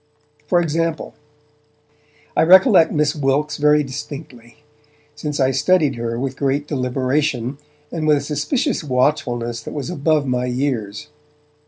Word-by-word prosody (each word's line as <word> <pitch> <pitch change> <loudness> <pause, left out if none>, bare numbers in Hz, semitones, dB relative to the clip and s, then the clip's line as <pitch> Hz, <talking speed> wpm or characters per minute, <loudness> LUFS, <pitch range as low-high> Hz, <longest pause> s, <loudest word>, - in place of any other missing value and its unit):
For 175 +2 +3
example, 165 -1 -2 1.2
I - - +3
recollect 185 0 +6
Miss 150 0 +1
Wilkes 145 +1 0
very 150 0 +3
distinctly, 140 -2 -9 0.5
since 150 0 -5
I 130 0 +3
studied 150 +2 +2
her 115 -1 -4
with 135 0 -4
great 140 +1 0
deliberation, 130 0 -1 0.3
and 155 -2 -3
with 150 -1 +5
a - - -2
suspicious 155 - -1
watchfulness 125 -4 -1
that - - -8
was 145 +3 -4
above 155 -2 +1
my 125 -1 -1
years. 125 -5 -3
145 Hz, 130 wpm, -20 LUFS, 130-155 Hz, 1.2 s, recollect